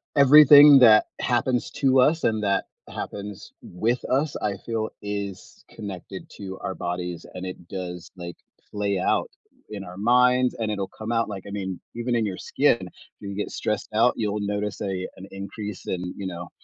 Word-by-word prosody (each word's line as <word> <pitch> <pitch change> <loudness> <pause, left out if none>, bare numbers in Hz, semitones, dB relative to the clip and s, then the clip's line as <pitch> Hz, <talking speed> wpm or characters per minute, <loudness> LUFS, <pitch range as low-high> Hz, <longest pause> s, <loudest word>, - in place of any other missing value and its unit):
everything 145 0 +9
that 110 -3 +7
happens 125 0 0
to 130 -1 +2
us 155 +6 +3
and 110 -1 +1
that 100 -1 +1 0.2
happens 100 -1 -7
with 115 +8 -1
us, 140 +3 0
I 100 -2 -1
feel 110 -2 -2
is 100 -2 -6
connected 95 -3 -8
to 95 -1 -7
our 95 - -4
bodies 90 -1 -4
and 90 0 -6
it 90 -2 -8
does, 90 -2 -7
like, 85 -1 -8 0.4
play 100 -2 -1
out 90 - +1 0.4
in 100 -2 -6
our 90 -1 -10
minds 125 +3 +3
and 110 -2 -1
it'll 100 -2 -2
come 110 +2 -5
out 115 -1 +1
like, 100 -3 -6
I 100 - -8
mean, 95 -3 -4 0.2
even 120 +1 -1
in 115 - +1
your 95 -3 -4
skin, - - +2
if - - -7 0.3
you 100 -1 -7
get 105 - -3
stressed 105 -2 -3
out, 115 +3 +4
you'll 105 -1 -2
notice 105 0 -3
a 95 -2 -3
an 95 - -9
increase 100 +1 -7
in, 90 0 -3
you 100 - -5
know, 85 -1 -7
105 Hz, 180 wpm, -24 LUFS, 95-120 Hz, 0.4 s, everything